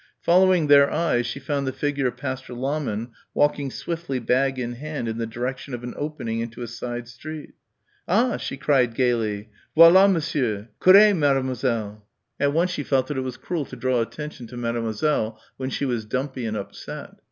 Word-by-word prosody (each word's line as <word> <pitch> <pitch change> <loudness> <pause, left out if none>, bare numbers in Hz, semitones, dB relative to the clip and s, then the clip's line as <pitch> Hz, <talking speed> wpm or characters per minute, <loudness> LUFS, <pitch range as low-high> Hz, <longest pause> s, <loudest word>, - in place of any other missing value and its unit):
Following 180 -1 +4
their 140 -1 +6
eyes 150 -7 +1
she 130 - -4
found 140 0 -2
the - - 0
figure 140 -1 -1
of 125 - -4
Pastor 130 -2 -5
Lahmann 125 -4 -2 0.2
walking 145 -1 +2
swiftly 165 0 -4
bag 130 +2 +1
in 120 -1 -3
hand 145 -1 -5
in 115 0 -3
the 115 - -2
direction 125 +3 -4
of 120 - -9
an 125 - -5
opening 145 -7 -3
into 115 +1 -5
a - - -5
side 120 +1 -5
street. 150 +6 -9 0.5
"Ah!" 230 +6 +2
she 135 - -5
cried 130 -5 +2
gaily. 110 -4 0 0.3
"Voilà 185 +4 +8
Monsieur; 125 - -1
courrez, 200 +3 +8
Mademoiselle!" 130 - 0 0.4
At 140 - +2
once 170 +4 +1
she 150 - -3
felt 135 -2 +1
that 145 - -3
it - - 0
was 130 -1 -5
cruel 165 -5 -3
to 130 - -10
draw 125 -1 +1
attention 150 0 -6
to 125 - -10
Mademoiselle 115 0 -1 0.2
when 130 0 -3
she 140 - -2
was 120 -4 -1
dumpy 130 +2 -3
and 110 0 -2
upset. 100 - -7
130 Hz, 180 wpm, -24 LUFS, 120-150 Hz, 0.5 s, Voilà